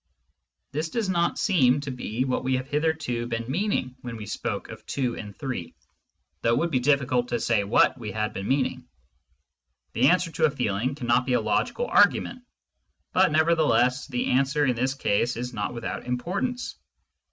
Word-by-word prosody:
This 155 +4 -2
does 220 +1 -1
not 170 -2 +1
seem 145 - +3
to 140 -1 -5
be 125 0 -3
what 130 -1 -1
we 130 0 +1
have 130 0 -2
hitherto 145 -5 -1
been 115 -1 -3
meaning 135 -5 -1
when 120 -3 -6
we 105 - -7
spoke - - -4
of - - -10
2 125 -4 -1
and 105 -2 -8
3, 130 - -5 0.7
though 115 - +2
it - - +2
would 170 0 0
be 130 - +2
difficult 125 -2 +2
to 120 -1 -1
say 115 -4 +1
what 105 +5 +3
we 110 -3 -5
had 110 +2 -2
been 100 - -4
meaning. 130 -2 0 1.1
The 125 +3 +4
answer 180 +1 +3
to 160 0 +2
a - - +4
feeling 125 -1 -1
cannot 125 -2 +1
be 130 - +1
a - - +4
logical 485 - 0
argument, 255 - +3 0.7
but 185 -2 +4
nevertheless 155 -5 +3
the 125 -4 -1
answer 140 +3 +2
in 125 -2 +1
this 130 +3 0
case 120 -1 0
is 125 +1 -4
not 105 -2 -2
without 115 +1 -5
importance. 195 - -2
130 Hz, 180 wpm, -26 LUFS, 120-155 Hz, 1.1 s, The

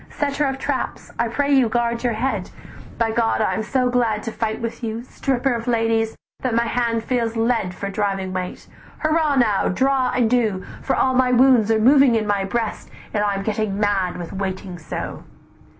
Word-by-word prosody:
"'Setter 290 0 -1
of 270 -1 -1
traps, - - -3
I 235 - +2
pray 285 +5 0
you 260 -4 +4
guard 235 0 0
your 240 -2 +1
head, 250 +5 -2 0.5
By 225 -1 +1
God 225 0 +1
I 215 - +1
am - - -1
so 255 +3 0
glad 230 -4 +1
to 225 - -4
fight 220 -1 -2
with 230 +1 -5
you, 225 +1 -3
Stripper 265 0 -1
of 235 +1 -4
ladies, 225 -1 +1 0.2
that 250 -3 -1
my 235 - +3
hand 230 -1 0
feels 235 -2 -1
lead 225 -6 0
"'For 200 - -4
driving 195 -2 -2
weight; 185 -1 -5 0.4
hurrah 310 -2 +2
now! 220 -6 +2
draw 260 +4 +1
and 250 -2 +2
do, 220 -6 +1 0.2
For - - 0
all 260 - +2
my 255 0 +3
wounds 250 -3 +5
are 225 - +4
moving 265 +1 +6
in 220 -1 +1
my 205 -1 +1
breast, 220 +3 -3 0.2
And 210 - +1
I 205 -1 +1
am 195 - -3
getting 210 -1 -1
mad 195 -4 +1
with 175 -2 -7
waiting 190 -2 -4
so. 155 - -5
230 Hz, 195 wpm, -21 LUFS, 210-250 Hz, 0.5 s, moving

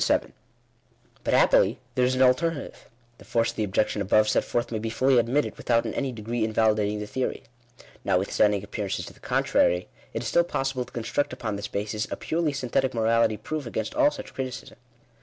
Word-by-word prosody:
But - - +2
happily - - +4
there 125 - +1
is 130 +1 +1
an 130 - +4
alternative. 140 +4 0 0.3
The - - -13
force 115 -1 +1
of - - -18
the 110 - -1
objec 105 +1 +1
tion 105 - -3
above 105 +2 +3
set - - +2
forth 120 0 -2
may 110 - -2
be 115 +1 -3
fully 130 +2 +3
admitted, 125 +6 0
without 115 -1 +1
in - - -3
any 135 -2 -2
de 110 -3 -9
gree 115 +1 -1
invalidating 110 -1 +1
the 105 - -4
theory. 130 +5 -3 0.6
Notwithstanding 100 +2 +2
appearances 105 -1 -3
to - - -11
the - - -21
contrary, 90 +1 +1 0.3
it - - -2
is - - -3
still 170 - +4
possible 135 -6 -2
to - - -18
construct 125 +4 -2
upon 110 -5 -3
this 100 +1 -4
basis, 105 +1 -3
a - - -3
purely 160 -1 -1
synthetic 130 -1 -1
morality 115 -1 +2
proof 155 0 -5
against 115 - -3
all 300 -1 +4
such 265 -3 -9
criticism. 130 -2 -6
115 Hz, 195 wpm, -26 LUFS, 105-135 Hz, 0.6 s, happily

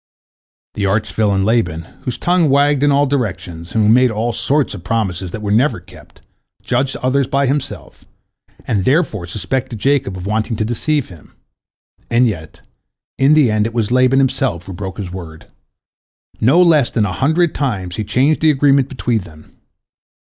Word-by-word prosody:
The 100 -1 -1
arch 100 -1 -1
villain 100 -2 +1
Laban, 100 -8 0 0.2
whose 125 - -3
tongue 175 -3 +2
wagged 140 0 +3
in 145 0 +3
all 140 +1 +3
directions, 95 - -4
and 110 - +3
who 105 - +3
made 125 +1 +4
all 115 +2 -2
sorts 140 +4 0
of 95 -4 -9
promises 95 -3 -2
that 105 +5 -7
were 100 - -2
never 120 +2 +2
kept, 90 +1 -18 0.4
judged 130 +2 -1
others 130 +1 +1
by 140 +1 +1
himself, 140 +1 -4 0.6
and 100 -3 0
therefore 130 - 0
suspected 115 +7 -3
Jacob 130 -5 0
of 90 - -7
wanting 110 +3 -1
to 110 - -1
deceive 140 +5 -1
him. 85 -5 -15 0.8
And 120 +1 +3
yet, 80 -8 -4 0.6
in 140 +3 +5
the 140 -7 +4
end, 105 0 +1
it 115 - -8
was 115 -1 -1
Laban 130 +1 +3
himself 130 -9 0
who 95 - -8
broke 95 0 -6
his 95 -4 -6
word. 85 -4 -9 0.9
No 145 +11 +5
less 155 -7 +4
than 110 -3 0
a 90 - -3
hundred 160 - +1
times 100 -11 -3
he 110 - -2
changed 135 +8 +1
the 160 - +4
agreement 140 -2 +3
between 125 -4 -1
them. 80 -4 -16
115 Hz, 175 wpm, -17 LUFS, 95-135 Hz, 0.9 s, in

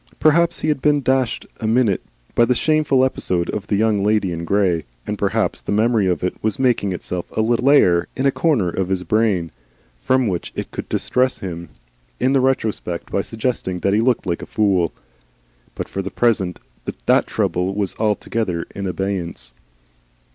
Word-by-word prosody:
Perhaps 170 +2 +3
he - - -1
had 150 -3 0
been 145 -1 +3
dashed 130 -3 +1
a 110 - -2
minute 110 -4 +2 0.3
by 120 - +4
the 125 +1 +3
shameful 150 -3 +3
episode 90 -9 -1
of 105 -1 -4
the 105 - +1
Young 105 -1 +2
Lady 105 -3 +2
in 85 0 -4
Grey, 90 -3 +1 0.2
and - - -2
perhaps - - 0
the - - -5
memory 110 -1 +2
of 90 -3 0
it 90 - 0
was 110 +4 0
making 120 -7 +1
itself 90 0 -4
a - - +4
little 120 +2 +1
lair 90 -12 +5
in 130 - -1
a 135 - +5
corner 140 - +1
of 90 +2 -2
his 95 -1 -1
brain 100 -6 +1 0.5
from 130 -2 +2
which 90 -4 -3
it - - -5
could - - -6
distress 130 0 +1
him 85 -3 -6 0.5
in 130 - +2
the 135 - +4
retrospect 110 -9 -1
by 100 - +1
suggesting 110 -5 -3
that 100 - +2
he 105 - +3
looked 125 0 +1
like 85 -2 -2
a - - -7
fool; 95 -6 +1 0.8
but - - -4
for 95 - -4
the 95 - -4
present 100 -4 +1 0.5
that - - +4
trouble 90 +2 -1
was 100 -2 -1
altogether 105 -4 -1
in 100 -1 -4
abeyance. 90 -9 -3
105 Hz, 185 wpm, -20 LUFS, 90-125 Hz, 0.8 s, lair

